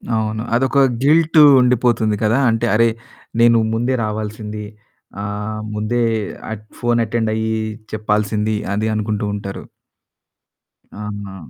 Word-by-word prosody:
అవును. 110 Hz, 0 st, -1 dB
అదొక 135 Hz, +3 st, +1 dB, 0.3 s
గిల్టు 160 Hz, +1 st, +5 dB, 0.2 s
ఉండిపోతుంది 120 Hz, -3 st, +2 dB
కదా! 110 Hz, +4 st, +3 dB
అంటే, 115 Hz, 0 st, 0 dB
"అరే! 115 Hz, +1 st, +4 dB, 0.5 s
నేను 115 Hz, 0 st, +6 dB, 0.2 s
ముందే 120 Hz, +3 st, 0 dB
రావాల్సింది 105 Hz, 0 st, -5 dB, 0.6 s
ఆహ్, 105 Hz, +1 st, -4 dB
ముందే 110 Hz, +3 st, -1 dB, 0.5 s
ఆట్ 110 Hz, -1 st, -6 dB, 0.2 s
ఫోన్ 120 Hz, 0 st, +1 dB
అటెండ్ 110 Hz, 0 st, -1 dB
అయ్యి 110 Hz, 0 st, -1 dB, 0.4 s
చెప్పాల్సింది" 105 Hz, 0 st, 0 dB, 0.2 s
అది 110 Hz, +2 st, 0 dB
అనుకుంటూ 105 Hz, 0 st, -2 dB
ఉంటారు. 100 Hz, -1 st, -6 dB, 1.4 s
ఆహా! 100 Hz, -2 st, -6 dB
110 Hz, 110 wpm, -19 LUFS, 105-120 Hz, 1.4 s, నేను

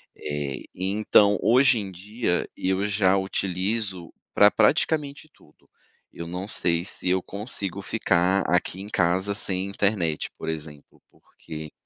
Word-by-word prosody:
Eh, 75 Hz, -2 st, -4 dB
então, 100 Hz, +2 st, +3 dB
hoje 125 Hz, +2 st, +4 dB
em 100 Hz, -2 st, -6 dB
dia, 100 Hz, +1 st, -2 dB
eu 95 Hz, +2 st, -1 dB
já 100 Hz, -2 st, +2 dB
utilizo 95 Hz, -1 st, -2 dB, 0.2 s
pra 105 Hz, 0 st, +7 dB
praticamente 145 Hz, +6 st, +1 dB
tudo. -, -, -25 dB, 0.5 s
Eu 85 Hz, -, -6 dB
não 90 Hz, +3 st, -5 dB
sei 85 Hz, -4 st, +1 dB
se 90 Hz, -, 0 dB
eu 95 Hz, 0 st, +1 dB
consigo 100 Hz, -2 st, -2 dB
ficar 95 Hz, -2 st, +1 dB
aqui 90 Hz, +1 st, 0 dB
em 100 Hz, -, -7 dB
casa 95 Hz, +1 st, +1 dB
sem 95 Hz, -2 st, -2 dB
internet, 100 Hz, -6 st, -1 dB
por -, -, -8 dB
exemplo, 75 Hz, -2 st, -7 dB
porque 75 Hz, -1 st, -11 dB
95 Hz, 130 wpm, -25 LUFS, 90-105 Hz, 0.5 s, pra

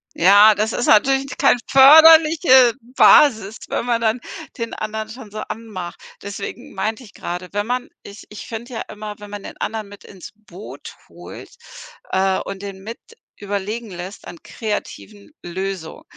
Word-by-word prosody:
Ja, 205 Hz, +4 st, +6 dB
das 215 Hz, +2 st, -1 dB
ist 245 Hz, -, -2 dB
natürlich 270 Hz, +5 st, +2 dB
kein -, -, +3 dB
förderliche 305 Hz, -2 st, +7 dB, 0.2 s
Basis, 220 Hz, -7 st, +5 dB
wenn -, -, -3 dB
man 235 Hz, -1 st, 0 dB
dann 225 Hz, +2 st, 0 dB, 0.4 s
den 230 Hz, -1 st, -5 dB
anderen 215 Hz, 0 st, -5 dB
schon 225 Hz, -1 st, -11 dB
so 215 Hz, +1 st, -8 dB
anmacht, 195 Hz, -6 st, -8 dB, 0.2 s
deswegen 200 Hz, 0 st, -8 dB
meinte 215 Hz, +6 st, -4 dB
ich 205 Hz, -, -16 dB
gerade, 180 Hz, +1 st, -7 dB
wenn 205 Hz, +1 st, -3 dB
man 250 Hz, +1 st, -3 dB
ich 200 Hz, +1 st, -13 dB
ich 210 Hz, -, -10 dB
finde 235 Hz, +2 st, -8 dB
ja 225 Hz, -, -4 dB
immer, 210 Hz, 0 st, -9 dB
wenn 205 Hz, -, -11 dB
man 205 Hz, -1 st, -8 dB
den -, -, -10 dB
anderen 215 Hz, 0 st, -5 dB
mit 200 Hz, 0 st, -15 dB
ins 190 Hz, -3 st, -13 dB
Boot 210 Hz, -2 st, -12 dB
holt, -, -, -12 dB, 0.6 s
äh, 190 Hz, 0 st, +1 dB
und 195 Hz, 0 st, -8 dB
den 195 Hz, -1 st, -8 dB
mit 225 Hz, +4 st, -9 dB, 0.4 s
überlegen 205 Hz, +2 st, -5 dB
lässt 180 Hz, +3 st, -9 dB
an 170 Hz, -, -11 dB
kreativen 210 Hz, -1 st, -7 dB
Löso 185 Hz, -1 st, -6 dB
215 Hz, 160 wpm, -19 LUFS, 195-235 Hz, 0.6 s, förderliche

